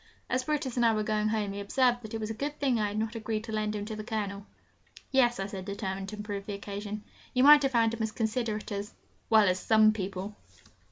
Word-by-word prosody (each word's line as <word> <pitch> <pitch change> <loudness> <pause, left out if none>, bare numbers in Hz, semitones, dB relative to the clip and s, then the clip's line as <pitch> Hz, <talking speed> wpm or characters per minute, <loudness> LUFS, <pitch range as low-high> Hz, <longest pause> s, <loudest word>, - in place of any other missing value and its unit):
As 255 +1 +1
Brutus 290 -4 -2
and 240 - +3
I 230 -1 +5
were 215 - 0
going 215 0 0
home, 210 -2 -1
he 200 - -5
observed 245 +4 +2
that 220 -1 -7
it - - -2
was 215 0 -3
a - - -2
good 285 +6 -4
thing 260 -5 +2
I 210 - +1
had 205 +1 -4
not 220 +1 -1
agreed 220 -1 -3
to 225 - -7
lend 215 -1 -1
him 205 -1 -3
to 215 0 -5
the 215 - -6
Colonel. 205 -3 -4 0.6
'Yes,' 245 -4 +3
I 195 - -1
said, 195 -1 -6
determined 195 -1 -4
to 215 - -6
improve 205 -1 -5
the 205 - -3
occasion, 205 +1 -6 0.3
'you 255 - +4
might 295 +2 +10
not - - -6
have 270 - +2
found 230 -1 +3
him 230 - -4
as 220 -1 -1
considerate 220 -1 -2
as 205 +1 -5 0.3
well, 220 -2 +6
as 185 0 +2
some 215 +2 +5
people!' 195 0 -5
215 Hz, 255 wpm, -29 LUFS, 205-230 Hz, 0.6 s, might